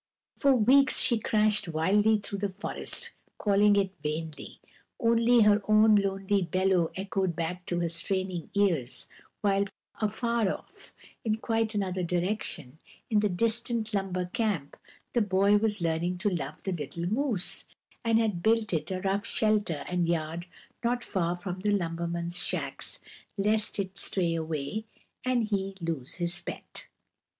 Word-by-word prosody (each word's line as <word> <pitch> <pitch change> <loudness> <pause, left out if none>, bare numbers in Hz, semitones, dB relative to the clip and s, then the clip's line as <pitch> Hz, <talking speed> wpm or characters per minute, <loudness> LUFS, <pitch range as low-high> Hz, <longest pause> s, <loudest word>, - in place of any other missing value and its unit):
For 275 -2 +4
weeks 260 +4 +5
she 235 -3 +3
crashed 215 -2 +2
wildly 200 +7 +3
through 200 -1 -6
the 205 0 -1
forest, 190 +2 -4 0.2
calling 205 0 +4
it 195 -2 +2
vainly; 155 0 -5 0.4
only 235 +1 +4
her 210 0 +5
own 215 0 +6
lonely 195 0 +2
bellow 185 -1 +2
echoed 190 -2 -1
back 175 +2 -4
to 175 -1 0
her 170 - 0
straining 180 0 -2
ears, 170 -12 +1 0.4
while 200 -1 +2 0.4
afar 220 0 +1
off, - - -9 0.3
in 220 -2 +1
quite 225 -1 -1
another 190 -2 -1
direction, 175 -5 -2 0.3
in 215 - +4
the 210 0 +2
distant 230 +3 0
lumber 190 -2 -1
camp 195 - -2 0.4
the 240 - +3
boy 200 0 +4
was 210 -2 0
learning 170 +2 0
to 200 +3 0
love 150 -4 -4
the 190 - -2
little 170 0 -4
moose, 220 -1 -1 0.4
and 230 -1 +3
had 215 -6 +1
built 220 -2 +2
it 160 - -1
a 185 -1 -3
rough 195 +1 0
shelter 210 -9 +1
and 175 -2 0
yard 165 +1 -2 0.4
not 240 +1 0
far 175 -3 -1
from 180 0 -5
the 210 +2 0
lumbermen's 170 -2 -1
shacks, - - -2 0.4
lest 210 +2 +1
it 195 -1 -3
stray 175 -4 +1
away, 160 +5 -3 0.4
and 245 -4 +1
he 195 -1 -1
lose 165 -7 -4
his 175 0 -1
pet. - - -8
195 Hz, 145 wpm, -29 LUFS, 175-215 Hz, 0.4 s, own